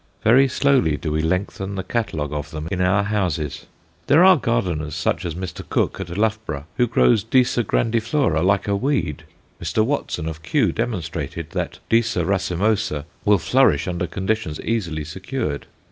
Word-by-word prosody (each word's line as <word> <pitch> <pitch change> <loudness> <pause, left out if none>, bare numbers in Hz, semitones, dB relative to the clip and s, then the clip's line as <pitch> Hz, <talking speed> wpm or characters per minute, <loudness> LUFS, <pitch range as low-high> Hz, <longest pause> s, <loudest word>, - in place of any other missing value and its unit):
Very 130 +5 +6
slowly 130 - +2
do 75 - -4
we 80 +1 0
lengthen 95 +3 -2
the 95 - -3
catalogue 80 -9 -2
of 75 +1 -4
them 75 +1 -6
in 90 - -1
our 95 +3 +3
houses. 90 -8 -2 0.4
There 155 +5 +6
are 190 0 +8
gardeners, 90 - -1
such 80 +2 -1
as 85 -2 -3
Mr. 90 -1 -5
Cook - - 0
at 90 -1 -5
Loughborough, 110 -9 -1
who 120 - +3
grow 115 +1 +4
Disa 120 +3 +2
grandiflora 115 - +1
like 100 +2 +2
a 100 - +1
weed. 125 - -1 0.4
Mr. 110 - +1
Watson 130 - -2
of 80 -1 -6
Kew 80 - +1
demonstrated 90 - -4
that - - -3
Disa 115 -6 +2
racemosa 95 -4 0 0.2
will 105 -1 +5
flourish 110 - +3
under 90 -1 -2
conditions 95 -3 -2
easily 85 -9 -2
secured. 95 - -4
95 Hz, 160 wpm, -22 LUFS, 80-115 Hz, 0.4 s, are